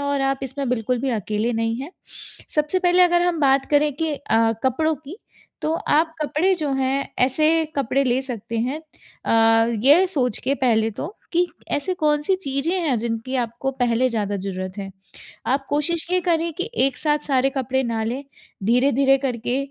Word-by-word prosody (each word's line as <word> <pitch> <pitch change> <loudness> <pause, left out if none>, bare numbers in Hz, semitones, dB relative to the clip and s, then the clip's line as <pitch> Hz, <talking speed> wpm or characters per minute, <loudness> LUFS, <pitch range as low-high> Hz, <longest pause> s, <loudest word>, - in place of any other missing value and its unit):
और 285 -1 -1
आप 270 - -2
इसमें 270 0 -3
बिल्कुल 245 0 0
भी 270 0 -1
अकेले 215 +4 -1
नहीं 225 0 -1
हैं। 290 +5 -7 0.6
सबसे 300 +4 +1
पहले 360 0 +4
अगर 350 0 +4
हम 350 -3 0
बात 270 -1 +3
करें 295 0 +3
कि 320 0 -2
अ, 225 -5 +1
कपड़ों 315 +5 +1
की 305 +6 -11 0.5
तो 310 - 0
आप 320 0 +1
कपड़े 315 +6 +1
जो 300 -5 -2
हैं 270 +1 0
ऐसे 310 +5 +3
कपड़े 275 +1 +1
ले 250 +1 +1
सकते 230 -3 -5
हैं 260 +7 -2 0.4
अ, 225 0 +4 0.2
ये 330 +7 +6
सोच 255 - -1
के 275 - +1
पहले 225 -4 +2
तो 315 - -7 0.2
कि 350 +1 +3 0.3
ऐसे 290 +6 0
कौन-सी 300 +1 +1
चीज़ें 275 +5 -1
हैं 285 -7 +1
जिनकी 230 +3 -3
आपको 240 +3 -3
पहले 245 -1 +1
ज़्यादा 205 -3 -2
ज़रूरत 185 0 -5
है? 195 -1 -5 0.6
आप 270 +2 0
कोशिश 315 +3 0
ये 365 0 +2
करें 335 -1 0
कि 365 - -4 0.2
एक 270 - -3
साथ 300 -1 +1
सारे 270 -1 +2
कपड़े 265 -1 -1
ना 225 -1 -2
लें, 255 +5 -3 0.4
धीरे-धीरे 270 +3 +3
करके 245 -2 -2
270 Hz, 175 wpm, -22 LUFS, 235-305 Hz, 0.6 s, ये